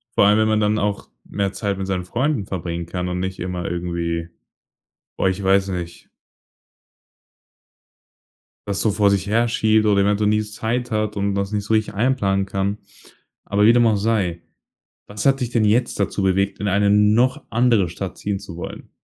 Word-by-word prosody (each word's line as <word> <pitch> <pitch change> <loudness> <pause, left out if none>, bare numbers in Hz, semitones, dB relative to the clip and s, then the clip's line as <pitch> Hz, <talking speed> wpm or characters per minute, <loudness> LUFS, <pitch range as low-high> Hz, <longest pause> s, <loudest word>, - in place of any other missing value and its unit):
Vor - - +5
allem, 105 +1 +4
wenn 110 - +3
man 110 0 +2
dann 105 +1 +1
auch 100 0 -2 0.2
mehr 100 -1 -2
Zeit 100 -2 -2
mit 95 - -3
seinen 90 -2 -2
Freunden 125 +1 -1
verbringen 85 -2 -4
kann 90 +1 -4
und 90 0 -3
nicht 95 +1 -4
immer 90 -1 -4
irgendwie 85 -1 -3 0.9
oh, - - -1
ich 95 +1 0
weiß 95 0 +3
nicht 85 -2 -6 2.6
was 100 -1 -1
so 110 - +2
vor 100 0 +3
sich 100 -1 +1
her 115 +3 +2
schiebt 110 -1 +2
oder 100 -1 +4
eventuell 105 +1 +2
nie 105 0 +2
Zeit 115 +3 -3
hat 105 -1 -1
und 100 0 0
was 100 0 -2
nicht 105 -1 -1
so 110 +2 -2
richtig 110 -2 0
einplanen 100 -5 +1
kann. 100 +1 -2 0.7
Aber 105 +1 +1
wie 115 - +7
dem 120 -1 +4
auch 110 - +3
sei: 100 -5 -1 0.6
Was 105 0 -6
hat 135 0 +3
dich 125 - -1
denn 115 -3 +1
jetzt 110 +3 +1
dazu 100 0 -1
bewegt, 95 +1 0
in 105 - -1
eine 100 +1 +2
noch 105 +5 +3
andere 115 -6 +2
Stadt 90 +3 -6
ziehen 100 -1 -2
zu 95 -4 -10
wollen? 85 - -8
100 Hz, 185 wpm, -21 LUFS, 95-110 Hz, 2.6 s, wie